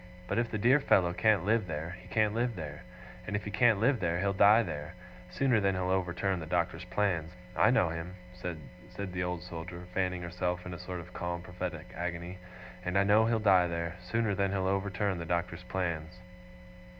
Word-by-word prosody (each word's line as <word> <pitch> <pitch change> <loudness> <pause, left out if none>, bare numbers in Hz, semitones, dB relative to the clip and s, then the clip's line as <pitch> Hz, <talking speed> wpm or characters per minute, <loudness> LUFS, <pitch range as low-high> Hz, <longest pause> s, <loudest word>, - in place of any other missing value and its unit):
But - - 0
if 120 -1 0
the 110 - -2
dear 125 +7 +5
fellow 90 -10 +3
can't 105 -2 +3
live 110 -1 +2
there, 80 +2 -4
he 90 - -15
can't 105 +3 +2
live 120 0 0
there. 75 -4 -6 0.5
And - - -2
if 100 - -2
he 105 - -4
can't 115 -4 +4
live 125 +3 +3
there, 85 -2 0
he'll 100 +1 +1
die 105 +4 +6
there, 75 -1 -6 0.3
sooner 115 +5 +2
than 100 -2 +1
he'll 95 0 -1
overturn 95 0 0
the 80 - -6
Doctor's 90 0 -1
plans. 90 -4 0 0.2
I - - +5
know 120 -9 +3
him,' 85 +2 -5 0.2
said 90 -4 -6 0.5
the 90 - -2
Old 90 -1 -3
Soldier, 85 0 -7
fanning 90 -2 -1
herself, 90 0 -2
in 90 - -5
a 85 - -7
sort 90 0 -5
of 90 +2 -13
calm 85 0 -3
prophetic 90 -3 -6
agony, 90 +2 -4 0.4
'and 90 +1 0
I 100 - +5
know 105 +3 +5
he'll 115 0 +2
die 95 -5 +5
there, 85 +1 -3
sooner 105 +4 0
than 100 0 +1
he'll 95 -1 -1
overturn 95 -1 0
the 85 - -4
Doctor's 85 0 -1
plans. 85 -2 -3
90 Hz, 200 wpm, -31 LUFS, 85-100 Hz, 0.5 s, die